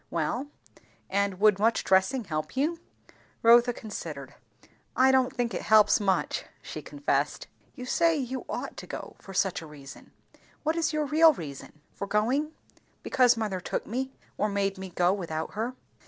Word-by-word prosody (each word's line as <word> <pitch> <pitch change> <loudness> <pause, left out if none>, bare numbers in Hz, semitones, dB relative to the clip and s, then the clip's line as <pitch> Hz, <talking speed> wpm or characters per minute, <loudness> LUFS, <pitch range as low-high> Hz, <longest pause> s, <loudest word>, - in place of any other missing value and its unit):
"Well, 170 - -2 0.6
and 200 -1 0
would 210 -2 +5
much 225 +2 +2
dressing 190 +7 +2
help 155 +3 -4
you?" 320 +5 0 0.6
Rotha 240 +1 +7
considered. 155 - -7 0.6
"I 260 +1 +5
don't 260 -1 +3
think 240 -3 -2
it - - -3
helps 215 -1 +5
much," 195 -3 0 0.2
she - - -7
confessed. 290 0 -1 0.3
"You 250 - -7
say, 330 +5 +3
you 260 -2 -3
ought - - -5
to - - -8
go - - -7
for 195 - -11
such 190 -2 +1
a 160 - -10
reason; 140 -2 -12 0.5
what 315 +1 +1
is 330 -2 +1
your 305 -1 0
real 315 +2 +6
reason?" 150 - -9
"For 200 - -5
going? 245 +10 +1 0.5
Because 250 -2 +4
mother 210 -4 -2
took - - -3
me; 260 +4 -3 0.3
or 210 - +1
made 200 -1 -1
me 190 0 -6
go 180 +1 +2
without 160 -5 -4
her." 230 +5 -3
215 Hz, 165 wpm, -28 LUFS, 190-260 Hz, 0.6 s, Rotha